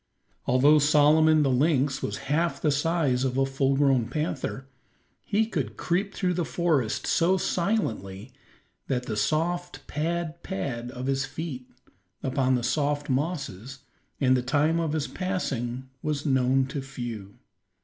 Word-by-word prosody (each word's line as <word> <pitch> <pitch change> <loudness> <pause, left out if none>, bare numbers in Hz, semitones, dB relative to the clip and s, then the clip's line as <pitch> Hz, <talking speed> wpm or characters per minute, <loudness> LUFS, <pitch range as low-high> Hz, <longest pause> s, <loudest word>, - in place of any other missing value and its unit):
Although 140 +5 +5
Solomon 150 +1 +5
the 135 - +2
lynx 135 0 +2
was 105 - -3
half 165 +5 0
the 150 - +2
size 145 -3 +1
of 130 -1 -1
a 135 - +3
full 135 0 +1
grown 135 -4 +3
panther, 135 -1 -3 0.6
he 215 +1 +1
could 135 - -3
creep 195 +4 -1
through 180 -2 0
the 175 0 -1
forest 155 -10 0
so 180 +3 +3
silently 130 - -2 0.6
that 125 -2 -1
the 110 - -3
soft 175 +8 -1
pad, 170 +1 -3
pad 125 -10 -4
of 125 0 -6
his 135 0 0
feet 135 -4 -6 0.5
upon 130 -1 +1
the 120 - -1
soft 145 +2 0
mosses, 135 - -3 0.4
and 130 -2 +4
the 125 - +1
time 150 +6 +1
of 160 -2 -1
his 155 -2 -1
passing 130 -10 -3
was 150 -1 -2
known 130 -1 +3
to 140 +1 -4
few. 120 -7 -7
140 Hz, 145 wpm, -26 LUFS, 130-160 Hz, 0.6 s, Although